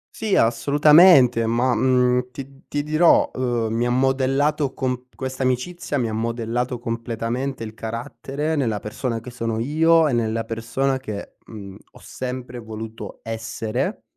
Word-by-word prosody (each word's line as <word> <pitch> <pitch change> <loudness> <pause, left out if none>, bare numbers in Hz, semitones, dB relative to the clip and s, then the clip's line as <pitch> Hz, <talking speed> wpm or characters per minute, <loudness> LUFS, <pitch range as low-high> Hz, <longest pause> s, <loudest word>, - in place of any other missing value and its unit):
Sì 215 -3 0
assolutamente 140 +1 +5
ma, 120 +2 +2
mhmm, 125 +1 +2
ti 135 +1 -10
ti 145 0 -2
dirò, 155 +3 +4
uhm, 120 -3 -1
mi 120 +1 0
ha - - 0
modellato 135 +3 +1
com 125 -1 -3
questa 130 0 -5
amicizia 135 +5 -1
mi 120 -3 0
ha 110 - -4
modellato 115 +2 -2
completamente 115 +2 -3
il 110 -1 -7
carattere 130 +7 -4
nella 120 -8 0
persona 115 +2 -4
che 120 +2 -10
sono 115 -2 -3
io 160 +5 +3
e 140 - -1
nella 115 -1 0
persona 115 +4 -2
che, 105 -6 -7
mhmm, 100 -3 -9 0.2
ho - - -15
sempre 125 -1 -6
voluto 110 0 -8
essere. 115 - -3
125 Hz, 145 wpm, -22 LUFS, 115-135 Hz, 0.2 s, assolutamente